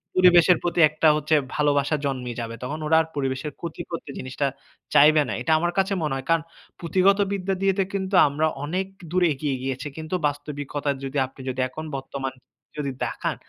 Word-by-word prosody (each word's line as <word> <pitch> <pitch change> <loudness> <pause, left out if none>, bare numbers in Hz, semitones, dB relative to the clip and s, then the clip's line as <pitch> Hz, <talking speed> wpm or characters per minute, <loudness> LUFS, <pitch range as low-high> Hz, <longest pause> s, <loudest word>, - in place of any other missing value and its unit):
পরিবেশের 180 -1 +6
প্রতি 175 0 -1
একটা 155 +1 +1
হচ্ছে 150 +1 +1 0.2
ভালোবাসা 145 0 +2
জন্মে 125 -3 -2
যাবে। 115 0 -5
তখন 150 +5 -4
ওরা 160 +1 +4
আর 160 - -5
পরিবেশের 135 +1 -2
ক্ষতি 170 0 -6
করতে 165 -3 -6
জিনিসটা 130 +2 -2 0.5
চাইবে 150 +1 +7
না। - - -3
এটা 160 - -1
আমার 175 +1 0
কাছে 195 +1 +2
মনে 150 -3 -1
হয়, 135 - -5
কারণ 165 -1 +3 0.4
পুঁথিগত 190 +4 +3
বিদ্যা 195 -1 -1
দিয়েতে 195 0 +2
কিন্তু 190 0 -1
আমরা 155 +3 +1 0.2
অনেক 185 +5 -2 0.2
দূর 180 0 +2
এগিয়ে 140 0 -2
গিয়েছি। 135 +2 -3
কিন্তু 160 +3 -4
বাস্তবিকতা 145 0 -4
যদি 135 +1 -4
আপনি 130 - -14
যদি, 130 0 -4
এখন 155 +4 -7
বর্তমান 135 0 -5 0.4
যদি 140 -2 -2
দেখান, - - -3
150 Hz, 180 wpm, -24 LUFS, 140-175 Hz, 0.5 s, চাইবে